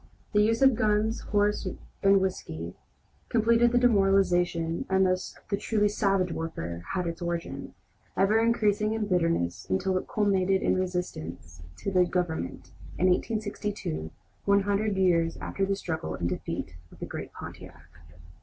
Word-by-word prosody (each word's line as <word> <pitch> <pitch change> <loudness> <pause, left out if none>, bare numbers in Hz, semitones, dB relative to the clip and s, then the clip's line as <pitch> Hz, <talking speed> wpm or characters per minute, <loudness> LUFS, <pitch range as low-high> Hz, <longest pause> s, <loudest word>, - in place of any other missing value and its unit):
The 210 - +5
use 225 +4 +3
of 265 -1 +7
gun, 215 -1 +2 0.2
horse, 205 -1 +1 0.3
and 195 0 +5
whiskey 85 - -3 0.6
completed 235 +1 +4
the 245 - +3
demoralization, 195 -7 +3
and 190 0 +4
thus 185 0 -1
the 200 - +2
truly 210 0 +1
"savage" 195 -3 +1
warfare 85 - -4
had 180 -1 0
its 170 0 -4
origin, 170 -1 -4 0.4
ever 205 +3 +4
increasing 215 -2 +2
in 220 -1 -1
bitterness 165 - 0
until 190 0 +1
it - - -10
culminated 195 -2 +2
in - - +3
resistance 130 - -4 0.2
to 195 - -3
the 185 -1 +5
Government, 175 - -3 0.3
in 185 - +3
1862, 205 - -2 0.4
one 200 0 +4
hundred 205 0 0
years 170 -3 +2
after 195 -1 -2
the 195 - +1
struggle 165 -4 -4
and 85 - -2
defeat 85 - -4
of - - -15
the - - -5
great - - -6
Pontiac. 75 +1 -11
190 Hz, 145 wpm, -28 LUFS, 170-210 Hz, 0.6 s, of